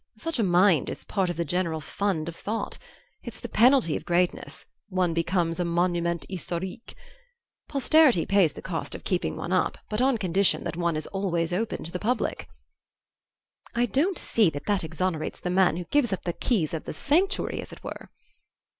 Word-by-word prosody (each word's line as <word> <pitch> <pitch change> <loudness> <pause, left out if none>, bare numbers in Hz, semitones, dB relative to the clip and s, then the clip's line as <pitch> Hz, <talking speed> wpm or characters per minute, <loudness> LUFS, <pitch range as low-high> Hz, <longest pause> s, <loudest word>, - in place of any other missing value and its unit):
Such 325 +3 -3
a - - +3
mind 180 -3 +4
is - - -6
part 190 -3 -1
of 175 - -3
the 170 - 0
general 170 0 -1
fund 165 +1 -2
of 170 - -5
thought. 220 +5 -4 0.4
It's - - -9
the - - -6
penalty 240 - +4
of - - -4
greatness 175 +1 -1 0.2
one 185 -3 +1
becomes 170 0 0
a - - +2
monument 170 0 0
historique. 185 +4 -5 0.7
Posterity 275 - +4
pays 195 -6 +3
the - - -10
cost 165 -3 -4
of - - -9
keeping 180 -2 -1
one 170 - -5
up, 185 - +1
but 210 +3 0
on 265 -1 +3
condition 190 -1 +2
that 170 - -4
one 170 -1 0
is 155 - -3
always 175 -4 -1
open 220 +5 -2
to 165 - -8
the 180 - -4
public." 230 +3 -1 1.3
"I 240 +1 +3
don't 305 - +1
see 215 -6 +3
that 145 -1 -7
that 205 -3 +1
exonerates 160 0 -2
the 180 - -3
man 180 -3 +3
who 180 - -3
gives 250 +3 +1
up 190 - -2
the 175 - -2
keys 175 - 0
of 160 - -4
the - - -5
sanctuary, 350 - +1
as - - -10
it - - -12
were." - - -7
180 Hz, 190 wpm, -26 LUFS, 170-215 Hz, 1.3 s, mind